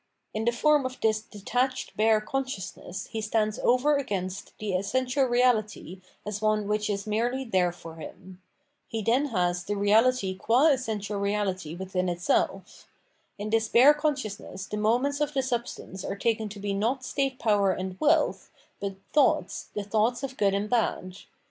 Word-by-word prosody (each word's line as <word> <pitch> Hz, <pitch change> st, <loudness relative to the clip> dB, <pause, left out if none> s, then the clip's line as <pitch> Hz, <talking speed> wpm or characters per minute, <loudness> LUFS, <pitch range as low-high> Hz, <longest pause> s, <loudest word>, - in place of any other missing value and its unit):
In 215 Hz, +1 st, -2 dB
the 235 Hz, -, +3 dB
form 295 Hz, +4 st, +3 dB
of 255 Hz, 0 st, -5 dB
this 215 Hz, -1 st, +1 dB
detached 245 Hz, +5 st, -2 dB
bare 220 Hz, 0 st, +4 dB
consciousness 215 Hz, -7 st, -4 dB
he 220 Hz, -, -3 dB
stands 215 Hz, 0 st, 0 dB
over 275 Hz, +4 st, +3 dB
against 195 Hz, -8 st, -4 dB
the 210 Hz, -2 st, -3 dB
essential 255 Hz, +8 st, +1 dB
reahty 220 Hz, -7 st, +1 dB, 0.2 s
as 210 Hz, 0 st, -4 dB
one 215 Hz, -1 st, +1 dB
which 210 Hz, 0 st, 0 dB
is 200 Hz, 0 st, -2 dB
merely 235 Hz, +5 st, 0 dB
there 185 Hz, -7 st, +1 dB
for 165 Hz, -1 st, -11 dB
him. 180 Hz, +3 st, -11 dB, 0.5 s
He 225 Hz, -2 st, -4 dB
then 245 Hz, +7 st, +2 dB
has 180 Hz, -6 st, 0 dB
the 205 Hz, +2 st, -2 dB
reahty 205 Hz, -1 st, +2 dB
qua 255 Hz, +10 st, +4 dB
essential 215 Hz, -7 st, -1 dB
reahty 195 Hz, -5 st, -2 dB
within 185 Hz, 0 st, -2 dB
itseH. 175 Hz, +2 st, -1 dB, 0.5 s
In 210 Hz, +1 st, -5 dB
this 225 Hz, 0 st, +2 dB
bare 260 Hz, +7 st, +7 dB
consciousness 260 Hz, -10 st, -3 dB
the 210 Hz, -, -5 dB
moments 250 Hz, +7 st, +1 dB
of 295 Hz, 0 st, -1 dB
the 270 Hz, -, +2 dB
substance 235 Hz, -6 st, -4 dB
are -, -, -4 dB
taken 220 Hz, 0 st, 0 dB
to 205 Hz, 0 st, -9 dB
be 200 Hz, 0 st, -2 dB
not 235 Hz, +7 st, 0 dB
state 270 Hz, 0 st, -1 dB
power 205 Hz, -4 st, +2 dB
and 185 Hz, 0 st, -4 dB
wealth, 310 Hz, 0 st, +2 dB, 0.3 s
but 200 Hz, -1 st, -4 dB, 0.2 s
thoughts, 230 Hz, -10 st, +2 dB
the 205 Hz, -, -2 dB
thoughts 225 Hz, +5 st, 0 dB
of 265 Hz, -1 st, -4 dB
Good 200 Hz, -4 st, +2 dB
and 200 Hz, +1 st, -1 dB
Bad. 205 Hz, -5 st, -1 dB
215 Hz, 165 wpm, -27 LUFS, 195-255 Hz, 0.5 s, bare